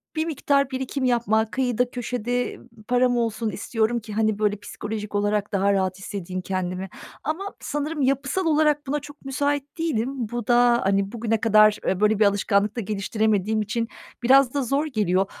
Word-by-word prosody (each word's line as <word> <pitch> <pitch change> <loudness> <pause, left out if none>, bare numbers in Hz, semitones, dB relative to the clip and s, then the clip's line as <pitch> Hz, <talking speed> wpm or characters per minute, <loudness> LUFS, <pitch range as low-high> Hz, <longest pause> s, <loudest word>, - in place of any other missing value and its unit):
bir 315 0 0
miktar 280 -3 +1
birikim 260 +1 -2
yapmak, 225 -3 +1
kıyıda 250 -2 0
köşede, 245 0 -2
ııı, - - -17 0.2
param 245 0 +3
olsun 230 -1 -1
istiyorum 225 +2 -1
ki, 215 -1 -9
hani, 215 -1 +1
böyle 210 -1 +2
psikolojik 210 0 -6
olarak 205 0 0
daha 200 +1 +2
rahat 190 -1 0
hissedeyim 185 -2 -5
kendimi. 185 0 -3 0.3
Ama 315 +6 -2 0.2
sanırım 295 +1 -3
yapısal 275 +7 0
olarak 300 -2 +2
buna 295 +2 0
çok 290 0 -13
müsait 285 +2 -2
değilim. 280 -8 0 0.2
Bu 240 -1 -4
da, 240 0 +4
hani, 195 0 +1
bugüne 225 -2 -1
kadar 215 -1 +5 0.2
böyle 210 0 +3
bir 215 - +5
alışkanlık 200 +1 +2
da - - 0
geliştiremediğim 215 +1 0
için 230 +2 -2 0.4
biraz 260 0 +5
da 285 -1 0
zor 275 +5 0
geliyor. 195 - +1
230 Hz, 165 wpm, -24 LUFS, 210-265 Hz, 0.4 s, kadar